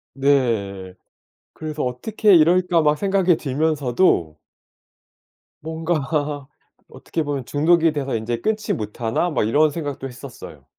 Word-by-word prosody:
네. 115 Hz, -9 st, 0 dB, 0.6 s
그래서 155 Hz, -1 st, -5 dB
어떻게 200 Hz, -, +2 dB
이럴까 175 Hz, +1 st, +4 dB
막 150 Hz, 0 st, +2 dB
생각이 190 Hz, -3 st, +2 dB
들면서도 140 Hz, -, 0 dB, 1.3 s
뭔가 155 Hz, -3 st, -2 dB, 0.4 s
어떻게 165 Hz, -, -4 dB
보면 145 Hz, -3 st, -3 dB
'중독이 165 Hz, +4 st, +2 dB
되서 135 Hz, -4 st, -2 dB
인제 115 Hz, +1 st, -3 dB
끊지 215 Hz, -1 st, -1 dB
못하나?' 115 Hz, -, -2 dB
막 125 Hz, -8 st, 0 dB
이런 150 Hz, +7 st, +3 dB
생각도 145 Hz, -3 st, -5 dB
했었어요. 130 Hz, 0 st, -11 dB
145 Hz, 260 characters per minute, -21 LUFS, 125-165 Hz, 1.3 s, 이럴까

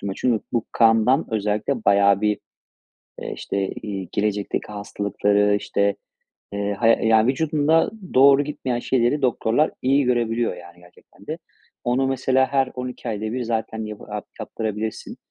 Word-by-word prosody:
çünkü 120 Hz, -3 st, +1 dB
bu 120 Hz, -2 st, 0 dB
kandan 115 Hz, +5 st, +4 dB
özellikle 105 Hz, +3 st, -1 dB
bayağı 100 Hz, 0 st, +4 dB
bir, 105 Hz, -1 st, +1 dB, 0.8 s
eee, -, -, -4 dB
işte, 100 Hz, -1 st, -2 dB
iii, 95 Hz, -4 st, -6 dB
gelecekteki 105 Hz, -1 st, -1 dB
hastalıkları, 100 Hz, 0 st, 0 dB
işte, 100 Hz, 0 st, 0 dB, 0.6 s
eee, 100 Hz, 0 st, -1 dB
hay 115 Hz, -1 st, +3 dB
yani, 110 Hz, 0 st, +4 dB
vücudunda 155 Hz, +3 st, +2 dB, 0.2 s
doğru 135 Hz, +2 st, +6 dB
gitmeyen 130 Hz, -4 st, -3 dB
şeyleri 125 Hz, +3 st, +1 dB
doktorlar 125 Hz, +3 st, +1 dB
iyi 140 Hz, +2 st, +3 dB
görebiliyor 120 Hz, -3 st, 0 dB
yani 85 Hz, 0 st, -14 dB
gerçekten 90 Hz, 0 st, -20 dB
de. -, -, -3 dB, 0.5 s
Onu, 125 Hz, +2 st, +1 dB
mesela, 130 Hz, 0 st, +2 dB
her 135 Hz, -2 st, +1 dB
12 125 Hz, -1 st, -6 dB
ayda 105 Hz, -2 st, -4 dB
bir 125 Hz, 0 st, -2 dB
zaten 110 Hz, -1 st, -3 dB
yabı 105 Hz, -1 st, -8 dB
yap -, -, -5 dB
yaptırabilirsin. 110 Hz, 0 st, -4 dB
115 Hz, 135 wpm, -22 LUFS, 105-130 Hz, 0.8 s, doğru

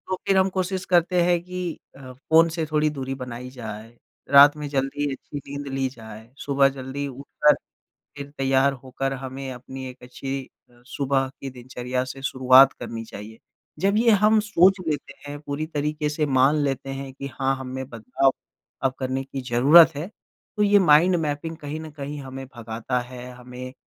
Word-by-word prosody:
तो 185 Hz, -, -1 dB
फ़िर 195 Hz, -, +4 dB
हम 190 Hz, 0 st, +4 dB
कोशिश 185 Hz, 0 st, -2 dB
करते 175 Hz, 0 st, +3 dB
हैं 175 Hz, 0 st, +3 dB
कि 180 Hz, -2 st, -5 dB, 0.2 s
अ, 130 Hz, -1 st, -10 dB
फ़ोन 160 Hz, +5 st, +3 dB
से 160 Hz, 0 st, -2 dB
थोड़ी 155 Hz, 0 st, +2 dB
दूरी 135 Hz, -3 st, -4 dB
बनाई 125 Hz, -1 st, -7 dB
जाए। 115 Hz, -3 st, -8 dB, 0.4 s
रात 140 Hz, +1 st, +9 dB
में 150 Hz, -1 st, -5 dB
जल्दी 140 Hz, +1 st, -1 dB
अच्छी 140 Hz, +2 st, -9 dB
नींद 140 Hz, 0 st, -7 dB
ली 135 Hz, 0 st, 0 dB
जाए, 110 Hz, -2 st, -12 dB
सुबह 140 Hz, -1 st, +3 dB
जल्दी 135 Hz, +1 st, -5 dB
उठकर 140 Hz, +2 st, +2 dB, 0.6 s
फ़िर 140 Hz, 0 st, -7 dB
तैयार 135 Hz, +1 st, +3 dB
होकर 135 Hz, +1 st, -3 dB
हमें 135 Hz, 0 st, -6 dB
अपनी 130 Hz, +1 st, -8 dB
एक 125 Hz, 0 st, -12 dB
अच्छी 135 Hz, +2 st, -5 dB, 0.3 s
अ, 120 Hz, 0 st, -23 dB
सुबह 135 Hz, 0 st, 0 dB
की 135 Hz, -, -5 dB
दिनचर्या 125 Hz, 0 st, -4 dB
से 130 Hz, +1 st, -9 dB
शुरुआत 130 Hz, 0 st, +6 dB
करनी 115 Hz, -2 st, -7 dB
चाहिए। 110 Hz, +1 st, -10 dB, 0.4 s
जब 195 Hz, +5 st, +2 dB
ये 230 Hz, +1 st, +4 dB
हम 215 Hz, +1 st, +5 dB
सोच 195 Hz, -3 st, +4 dB
लेते 145 Hz, -2 st, -3 dB
हैं 145 Hz, 0 st, -6 dB
पूरी 145 Hz, +1 st, -4 dB
तरीक़े 150 Hz, -1 st, -2 dB
से 150 Hz, +1 st, -1 dB
मान 135 Hz, +2 st, +4 dB
लेते 135 Hz, -1 st, -2 dB
हैं 135 Hz, -1 st, -7 dB
कि 140 Hz, +1 st, -7 dB
हाँ 135 Hz, 0 st, +2 dB
हममें 130 Hz, 0 st, -6 dB
बदलाव 125 Hz, +3 st, +1 dB, 0.5 s
अब 135 Hz, -, +2 dB
करने 130 Hz, 0 st, -2 dB
की 135 Hz, 0 st, -6 dB
ज़रूरत 155 Hz, +7 st, +7 dB
है 150 Hz, +4 st, -4 dB, 0.5 s
तो 210 Hz, -, +1 dB
ये 205 Hz, 0 st, +5 dB
माइंड 175 Hz, 0 st, +5 dB
मैपिंग 155 Hz, +1 st, -3 dB
कहीं 150 Hz, 0 st, -6 dB
न 160 Hz, 0 st, -8 dB
कहीं 145 Hz, 0 st, -6 dB
हमें 135 Hz, 0 st, -8 dB
भगाता 115 Hz, +2 st, -3 dB
है। 125 Hz, 0 st, -9 dB
हमें 125 Hz, +1 st, -9 dB
135 Hz, 180 wpm, -24 LUFS, 130-150 Hz, 0.6 s, रात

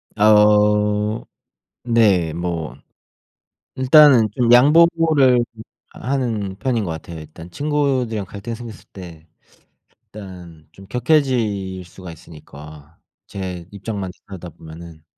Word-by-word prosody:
아우 105 Hz, 0 st, +3 dB, 0.6 s
네 105 Hz, -9 st, +2 dB
뭐 85 Hz, -2 st, -4 dB, 1.0 s
일단은 130 Hz, -3 st, +5 dB
좀 120 Hz, -2 st, +2 dB
양보를 150 Hz, -2 st, +4 dB, 0.5 s
하는 115 Hz, -8 st, -3 dB
편인 115 Hz, +1 st, -2 dB
것 90 Hz, -, -4 dB
같아요. 80 Hz, +1 st, -9 dB
일단 80 Hz, +3 st, -12 dB
친구들이랑 130 Hz, -, -2 dB
갈등이 105 Hz, +5 st, -7 dB
생겼을 115 Hz, -2 st, -11 dB
때 85 Hz, -4 st, -12 dB, 0.8 s
일단은 90 Hz, -6 st, -12 dB
좀 95 Hz, 0 st, -16 dB
격해질 115 Hz, -8 st, -1 dB
수가 90 Hz, +1 st, -12 dB
있으니까 75 Hz, -1 st, -14 dB, 0.3 s
제 90 Hz, -3 st, -7 dB
입장만 100 Hz, -2 st, -6 dB, 0.2 s
들여다보면은 85 Hz, -3 st, -12 dB
105 Hz, 220 characters per minute, -19 LUFS, 85-120 Hz, 1.0 s, 일단은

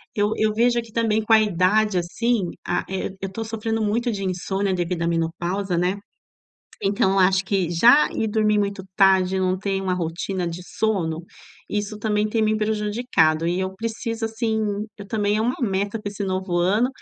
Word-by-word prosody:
Eu 210 Hz, 0 st, +1 dB
eu 215 Hz, 0 st, +2 dB
vejo 235 Hz, +2 st, +2 dB
que 230 Hz, -, -14 dB
também 220 Hz, -1 st, +1 dB
com 220 Hz, -, -3 dB
a 220 Hz, -, +8 dB
idade, 205 Hz, +1 st, +2 dB
assim, 200 Hz, +4 st, 0 dB, 0.2 s
ah, -, -, 0 dB
eh, 190 Hz, 0 st, -3 dB
eu 195 Hz, 0 st, -4 dB
tô 225 Hz, +3 st, -4 dB
sofrendo 225 Hz, 0 st, -2 dB
muito 235 Hz, +4 st, 0 dB
de 200 Hz, -2 st, -4 dB
insônia, 190 Hz, +2 st, -1 dB
devido 175 Hz, -1 st, -2 dB
à -, -, 0 dB
menopausa, 175 Hz, +3 st, -1 dB
né. 180 Hz, +3 st, +1 dB, 0.9 s
Então, 195 Hz, -1 st, +2 dB
acho 190 Hz, 0 st, +4 dB
que 190 Hz, -3 st, 0 dB
já 235 Hz, -, +6 dB
ir 220 Hz, -, -1 dB
dormir 215 Hz, -1 st, +2 dB
muito 200 Hz, -1 st, -1 dB
tarde, 190 Hz, -2 st, +4 dB
eu 190 Hz, -, 0 dB
não 185 Hz, 0 st, +1 dB
tenho 195 Hz, 0 st, -2 dB
uma 185 Hz, -, 0 dB
rotina 180 Hz, +1 st, -2 dB
de 170 Hz, +2 st, -6 dB
sono, 175 Hz, -7 st, -1 dB, 0.5 s
isso 210 Hz, 0 st, -3 dB
também 210 Hz, 0 st, 0 dB
tem 220 Hz, +1 st, -1 dB
me 215 Hz, 0 st, +2 dB
prejudicado 210 Hz, -7 st, +1 dB
e 175 Hz, +2 st, 0 dB
eu 190 Hz, 0 st, -3 dB
preciso, 230 Hz, +1 st, -4 dB
assim, 220 Hz, 0 st, -1 dB, 0.4 s
eu 200 Hz, -1 st, -9 dB
também 205 Hz, -1 st, 0 dB
é 220 Hz, -, +1 dB
uma 245 Hz, +3 st, 0 dB
meta 205 Hz, -1 st, -1 dB
para 205 Hz, -, -5 dB
esse 200 Hz, 0 st, -4 dB
novo 185 Hz, -2 st, -2 dB
ano, 200 Hz, +8 st, +2 dB
200 Hz, 190 wpm, -23 LUFS, 185-220 Hz, 0.9 s, a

